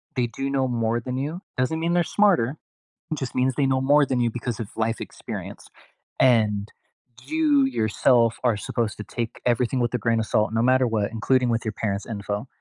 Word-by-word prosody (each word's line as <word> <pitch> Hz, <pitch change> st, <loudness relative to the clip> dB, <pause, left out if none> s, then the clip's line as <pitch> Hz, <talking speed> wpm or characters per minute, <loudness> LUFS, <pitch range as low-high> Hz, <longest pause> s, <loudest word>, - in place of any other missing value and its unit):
they 125 Hz, -2 st, +1 dB
do 135 Hz, +4 st, -4 dB
know 135 Hz, -1 st, +1 dB
more 115 Hz, -1 st, 0 dB
than 125 Hz, +2 st, -4 dB
you." 150 Hz, +7 st, -3 dB, 0.2 s
Doesn't 130 Hz, +5 st, 0 dB
mean 165 Hz, +1 st, 0 dB
they're 175 Hz, 0 st, +3 dB
smarter, 170 Hz, -, +2 dB, 0.6 s
just 135 Hz, -4 st, -5 dB
means 130 Hz, 0 st, +1 dB
they 140 Hz, -, +2 dB
know 130 Hz, 0 st, +1 dB
more 145 Hz, +2 st, +4 dB
than 130 Hz, -2 st, -1 dB
you 120 Hz, -, +2 dB
because 120 Hz, -1 st, -4 dB
of 115 Hz, -, -4 dB
life 115 Hz, +1 st, -1 dB
experience, -, -, -8 dB, 0.5 s
and, 110 Hz, -5 st, +3 dB, 0.5 s
you, 300 Hz, -3 st, +3 dB
yourself, 115 Hz, -, +2 dB
are 120 Hz, -4 st, +2 dB
supposed 110 Hz, +1 st, -2 dB
to 105 Hz, -, -6 dB
take 115 Hz, +1 st, -5 dB
everything 125 Hz, +1 st, +1 dB
with 120 Hz, -1 st, 0 dB
a -, -, +2 dB
grain 115 Hz, +1 st, +1 dB
of 110 Hz, -, -1 dB
salt 110 Hz, +1 st, +1 dB
no 115 Hz, -, +2 dB
matter 130 Hz, +1 st, +3 dB
what, 110 Hz, -2 st, -1 dB
including 125 Hz, +2 st, +1 dB
with 115 Hz, 0 st, -1 dB
your 110 Hz, -, -1 dB
parents' 100 Hz, -2 st, -3 dB
info, 105 Hz, +1 st, -4 dB
120 Hz, 200 wpm, -24 LUFS, 115-135 Hz, 0.6 s, more